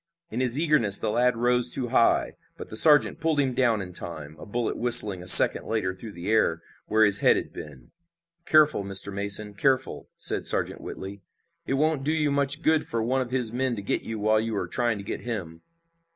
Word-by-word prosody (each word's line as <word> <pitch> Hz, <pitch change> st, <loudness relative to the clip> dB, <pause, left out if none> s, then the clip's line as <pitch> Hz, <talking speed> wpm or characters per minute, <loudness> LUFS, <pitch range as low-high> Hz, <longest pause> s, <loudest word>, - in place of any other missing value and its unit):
In 120 Hz, -, -5 dB
his 130 Hz, 0 st, 0 dB
eagerness 150 Hz, -11 st, +1 dB
the 110 Hz, -, -3 dB
lad 125 Hz, +1 st, 0 dB
rose 125 Hz, +1 st, +3 dB
too 120 Hz, -1 st, -1 dB
high, 120 Hz, -2 st, 0 dB, 0.2 s
but -, -, -11 dB
the -, -, -9 dB
sergeant 150 Hz, +5 st, +3 dB
pulled 160 Hz, -2 st, -2 dB
him 135 Hz, -2 st, -1 dB
down 115 Hz, -5 st, -1 dB
in 90 Hz, -1 st, -12 dB
time, 80 Hz, -4 st, -8 dB
a -, -, -12 dB
bullet 120 Hz, +2 st, -4 dB
whistling 110 Hz, -6 st, +5 dB
a 90 Hz, -, -13 dB
second -, -, +8 dB
later 110 Hz, -5 st, -3 dB
through 105 Hz, +3 st, -12 dB
the 85 Hz, +2 st, -10 dB
air 95 Hz, -7 st, -1 dB, 0.2 s
where 110 Hz, 0 st, +2 dB
his 100 Hz, -1 st, +5 dB
head -, -, +2 dB
had -, -, -6 dB
been. 65 Hz, -5 st, -13 dB, 0.6 s
"Careful, 150 Hz, -8 st, +2 dB
Mr. 100 Hz, 0 st, -2 dB
Mason! 100 Hz, +1 st, -1 dB
Careful!" 130 Hz, +5 st, -3 dB
said -, -, -2 dB
Sergeant -, -, -2 dB
Whitley. 100 Hz, +1 st, -10 dB, 0.5 s
"It 135 Hz, -, -2 dB
won't 150 Hz, 0 st, -2 dB
do 150 Hz, -, -2 dB
you 150 Hz, -2 st, -1 dB
much 140 Hz, +2 st, -1 dB
good 160 Hz, -1 st, +1 dB
for 115 Hz, -1 st, -4 dB
one 130 Hz, +3 st, -2 dB
of 125 Hz, -, -6 dB
his 125 Hz, -3 st, -3 dB
men 130 Hz, 0 st, -2 dB
to 100 Hz, -, -9 dB
get -, -, -3 dB
you 115 Hz, -, -7 dB
while 110 Hz, +1 st, 0 dB
you 110 Hz, 0 st, -5 dB
are 90 Hz, -, -4 dB
trying 120 Hz, +3 st, -3 dB
to 100 Hz, -, -10 dB
get -, -, -7 dB
him!" 90 Hz, -9 st, -8 dB
115 Hz, 215 wpm, -24 LUFS, 100-130 Hz, 0.6 s, second